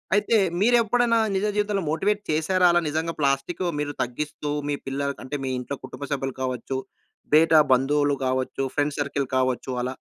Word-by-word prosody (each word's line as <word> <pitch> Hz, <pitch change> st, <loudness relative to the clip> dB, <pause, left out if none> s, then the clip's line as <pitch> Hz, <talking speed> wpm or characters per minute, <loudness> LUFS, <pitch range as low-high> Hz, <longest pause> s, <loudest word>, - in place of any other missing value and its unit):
అయితే, 210 Hz, +2 st, +3 dB, 0.2 s
మీరెప్పుడైనా 235 Hz, +1 st, +3 dB, 0.2 s
నిజ 195 Hz, +2 st, 0 dB
జీవితంలో 205 Hz, -2 st, 0 dB
మోటివేట్ 205 Hz, +6 st, 0 dB
చేశారా, 180 Hz, +4 st, +3 dB
అలా 175 Hz, -, +4 dB
నిజంగా 160 Hz, +2 st, -2 dB
ప్లాస్టికు 140 Hz, +6 st, 0 dB
మీరు 145 Hz, 0 st, -2 dB
తగ్గిస్తూ, 145 Hz, +4 st, -4 dB, 0.2 s
మీ 145 Hz, -, +1 dB
పిల్లలకు 140 Hz, +1 st, -2 dB
అంటే, 140 Hz, +3 st, -4 dB
మీ -, -, -2 dB
ఇంట్లో 125 Hz, +3 st, -5 dB
కుటుంబ 140 Hz, -, -9 dB
సభ్యులు 135 Hz, -1 st, -2 dB
కావచ్చు, 130 Hz, +1 st, -3 dB, 0.6 s
బేటా 160 Hz, 0 st, +6 dB
బంధువులు 145 Hz, +3 st, +3 dB
గావచ్చు, 130 Hz, +1 st, -1 dB
ఫ్రెండ్ 145 Hz, 0 st, 0 dB
సర్కిల్ 140 Hz, -1 st, -1 dB
కావచ్చు, 130 Hz, 0 st, 0 dB
అలా? 125 Hz, -, -1 dB
145 Hz, 155 wpm, -24 LUFS, 135-185 Hz, 0.6 s, బేటా